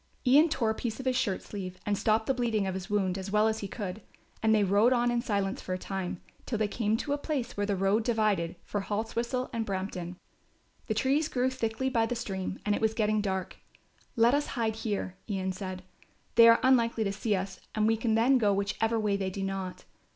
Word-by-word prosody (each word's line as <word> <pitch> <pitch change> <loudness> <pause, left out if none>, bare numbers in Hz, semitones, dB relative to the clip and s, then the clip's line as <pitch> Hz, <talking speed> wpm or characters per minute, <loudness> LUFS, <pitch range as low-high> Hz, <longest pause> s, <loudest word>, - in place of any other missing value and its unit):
Ian 290 +6 +6
tore 230 -7 +1
a - - 0
piece 225 +1 -4
off 265 - -6
his 255 -1 +1
shirt 225 -7 0
sleeve 185 -3 -6
and 205 - +1
stopped 220 +2 +1
the 270 - +2
bleeding 230 -5 0
of 190 - -2
his 190 0 -6
wound 195 -2 0
as 190 +1 -5
well 210 +2 +3
as 220 0 0
he 200 - -4
could, 200 0 -5 0.4
and 220 - +3
they 215 -2 +4
rode 205 +6 +4
on 240 -1 +2
in 240 0 +1
silence 200 -4 -1
for 185 - -4
a - - -1
time, 185 -2 -4 0.3
till 230 - -1
they 215 0 +1
came 220 +1 0
to 285 - -4
the 290 - 0
place 270 -5 -3
where 205 0 -1
the 200 - +1
road 195 +4 +2
divided 215 -8 +1
for 205 - -3
Haltwhistle 230 +5 -2
and 230 -1 -1
Brampton. 185 -3 -4 0.7
The 220 - -1
trees 275 +7 +2
grew 255 -3 0
thickly 260 0 -2
by 230 -4 +2
the 245 - -2
stream 195 -5 -4
and 210 - +2
it - - -1
was 220 0 +1
getting 215 -1 +1
dark. 190 -2 -3 0.6
"Let 235 +1 +5
us 290 +1 +1
hide 220 -2 0
here," 200 -4 -3
Ian 190 -2 -1
said. 185 -1 -6 0.5
"They 230 0 +8
are 230 0 +7
unlikely 235 -3 +3
to 200 -1 -1
see 210 +1 0
us 190 0 -4 0.2
and 215 -1 +2
we 225 +1 +4
can 225 0 0
then 250 +4 +4
go 205 -3 +3
whichever 220 +3 0
way 210 -2 +1
they 190 -1 -2
do 195 +1 -4
not. 195 -1 -4
215 Hz, 230 wpm, -29 LUFS, 195-235 Hz, 0.7 s, They